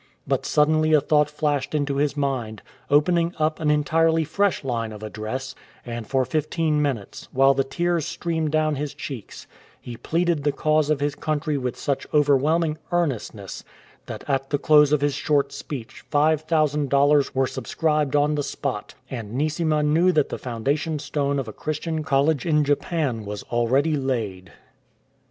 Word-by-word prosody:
But - - -1
suddenly 155 +1 +3
a 155 - +7
thought 150 +1 +2
flashed 150 -1 -1
into 145 -2 0
his 145 +1 0
mind, 125 -7 -2 0.3
opening 170 +4 +3
up 155 0 0
an 155 -2 0
entirely 160 +2 +2
fresh 200 +4 0
line 115 -4 -2
of 105 0 -9
address, 110 +5 -5 0.3
and 120 -2 -6
for 130 -1 +1
fifteen 155 0 0
minutes, 130 -9 -3
while 135 +1 +5
the 135 0 +1
tears 170 +4 -1
streamed 160 -3 -2
down 155 -1 +1
his 145 0 -4
cheeks, 130 -7 -8 0.3
he 120 - -8
pleaded 165 +4 0
the 145 - +2
cause 155 +1 +1
of 150 -2 +1
his 145 0 0
country 155 0 -2
with 125 -3 -3
such 140 -2 -2
overwhelming 150 +3 +2
earnestness 125 - -2 0.4
that - - -7
at 135 -1 -1
the 145 - +1
close 150 0 +5
of 150 -2 +2
his 145 -1 +1
short 140 -1 +1
speech 130 -7 -8
5000 150 -1 +2
dollars 140 0 +3
were 135 0 +3
subscribed 150 +1 -1
on 145 +1 +3
the 150 - 0
spot, 140 -5 -4 0.2
and 115 -4 -6
Neesima 155 +1 +1
knew 165 +5 +3
that 150 -4 +2
the - - -5
foundation 140 +6 -2
stone 140 -1 -1
of 135 -4 -3
a 110 - -7
Christian 155 +3 -3
College 140 -1 +2
in 150 -3 +2
Japan 145 -4 -1
was 105 0 -6
already 130 +6 +2
laid. 115 -9 -3
145 Hz, 165 wpm, -23 LUFS, 135-155 Hz, 0.4 s, a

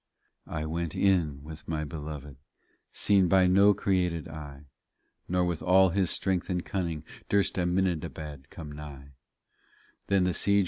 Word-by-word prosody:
40 75 - -4
I - - -4
went 80 +1 -3
in 80 -8 +2
with 80 +1 -10
my 80 -1 -2
Belored, 75 -3 -7 0.5
Seen 100 -3 +3
by 95 +1 +5
no 100 +3 +5
created 90 -5 0
eye, 75 -3 -9 0.6
Nor 90 0 +2
with 85 -3 -2
all 95 +1 +5
his 90 0 +1
strength 95 -1 -1
and 90 -1 -1
cunning 85 -5 -3 0.3
Durst 100 -1 +2
Aminadabad 85 -6 -2
come 80 -3 -9
nigh. 75 -2 -9
85 Hz, 130 wpm, -28 LUFS, 75-95 Hz, 0.6 s, by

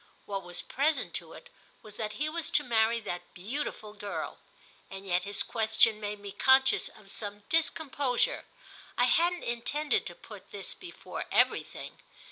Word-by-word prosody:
What 195 -1 -3
was 175 -1 -4
present 300 +4 +1
to - - -13
it - - -13 0.3
was 210 -2 -10
that 215 -1 -3
he 300 - -1
was 325 +1 -1
to - - +3
marry 230 -1 +3
that 175 -4 -6
beautiful 215 +1 -3
girl; 205 -1 -5 0.5
and 195 0 -8
yet 180 -1 +1
his 205 0 +2
question 220 -1 +3
made 210 0 -4
me 200 0 -7
conscious 265 +5 +5
of 200 -2 -14
some 205 -1 -5
discomposure—I 305 - 0
hadn't 345 +7 +3
intended 260 +6 0
to - - -7
put - - -12
this - - -3
before 360 -2 -7
everything. - - +1
225 Hz, 150 wpm, -30 LUFS, 205-290 Hz, 0.5 s, conscious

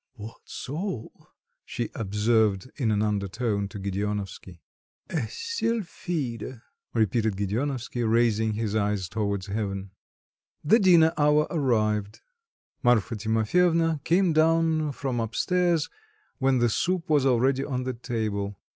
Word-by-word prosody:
"What 110 0 -9
soul!" 145 - -6 0.4
she 120 - -4
observed 105 +1 +1
in 125 -7 0
an 105 0 +2
undertone 100 0 -1
to 100 - -9
Gedeonovsky. 100 -2 -4 0.5
"A 140 -9 -1
sylphide!" 170 - -3 0.4
repeated 110 -1 +1
Gedeonovsky, 120 +5 -2
raising 110 -1 +2
his 110 -1 -2
eyes 100 -3 0
towards 100 -2 -2
heaven. 100 -2 -3 0.7
The 220 +10 +5
dinner 170 -4 +6
hour 150 +1 +4
arrived. 110 - 0 0.6
Marfa 120 -3 +2
Timofyevna 160 - +2
came 175 +1 +3
down 160 -1 +3
from 130 -3 -3
up 115 0 -4
stairs, 175 -4 +2 0.5
when 135 -1 +3
the 120 -1 +3
soup 180 - 0
was 150 -4 +3
already 130 +2 +2
on 130 -3 -2
the 130 0 -2
table. 110 -5 -3
120 Hz, 120 wpm, -26 LUFS, 105-150 Hz, 0.7 s, dinner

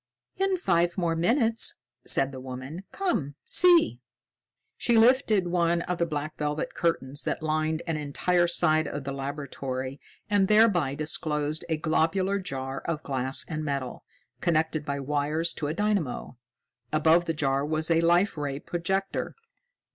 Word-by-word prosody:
"In 385 -1 +1
five 175 - +1
more 170 -3 0
minutes," 225 - +3 0.3
said 135 0 +4
the 130 - -8
woman. 130 +8 -7
"Come 175 - -2
see." 350 -2 +5 0.8
She 235 -1 +1
lifted 225 -4 +4
one 170 -1 +1
of 180 -1 -3
the 170 - +1
black 150 0 -5
velvet 150 0 -2
curtains 145 -4 -1
that - - -3
lined 155 +1 -1
an 165 -2 -1
entire 175 +4 +1
side 155 -2 +2
of 145 - -5
the 140 - -4
laboratory 135 -1 -5 0.3
and 205 -2 +2
thereby 205 -10 +3
disclosed 150 +1 -1
a 160 - 0
globular 170 +5 +1
jar 135 -6 -5
of 160 -2 -3
glass 130 -1 -2
and 155 -2 -4
metal, 140 -4 -4 0.4
connected 155 -2 0
by 140 -1 -3
wires 150 +4 -1
to 145 - -4
a 150 - -2
dynamo. 200 -12 -1 0.6
Above 160 +3 +3
the 165 - -1
jar 140 -2 0
was 155 +2 -1
a 165 0 +4
Life 175 +4 +3
Ray 140 -2 -3
projector. 190 +4 -3
160 Hz, 145 wpm, -27 LUFS, 145-175 Hz, 0.8 s, see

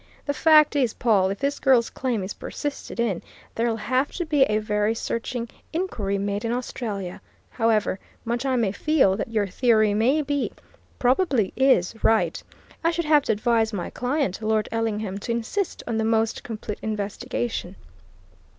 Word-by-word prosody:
The 285 - 0
fact 305 0 +5
is, 255 -6 +1
Pawle, 200 -5 +3
if 195 - -3
this 280 +4 -1
girl's 250 -3 +3
claim 245 -6 -2
is 190 - -4
persisted 290 -4 -6
in, 215 -7 0 0.3
there'll 230 0 0
have 255 +6 0
to 350 - -3
be 300 -3 +1
a 210 -3 +1
very 210 +1 0
searching 230 +1 -3 0.3
inquiry 220 - -1
made 200 +1 -2
in 230 - -1
Australia. 215 -6 -4 0.3
However 220 -4 +1 0.3
much 235 +2 -1
I 265 -1 +1
may 225 -6 +1
feel 265 -4 +3
that 220 - -3
your 215 -3 +1
theory 215 +1 +3
may 255 +9 +2
be 285 -1 -1 0.4
probably 255 - +2
is 260 -10 +3
right, 225 0 +2 0.4
I 330 - +4
should 340 0 -1
have 300 -1 +5
to - - +2
advise 225 0 +1
my 180 -4 -4
client, 250 - -1
Lord 215 -1 +1
Ellingham, 215 -3 -2
to 235 - -4
insist 235 - -2
on 225 -2 -1
the - - +1
most 225 0 +1
complete 215 -2 -6
investigation." 210 -1 -3
230 Hz, 165 wpm, -24 LUFS, 210-265 Hz, 0.4 s, fact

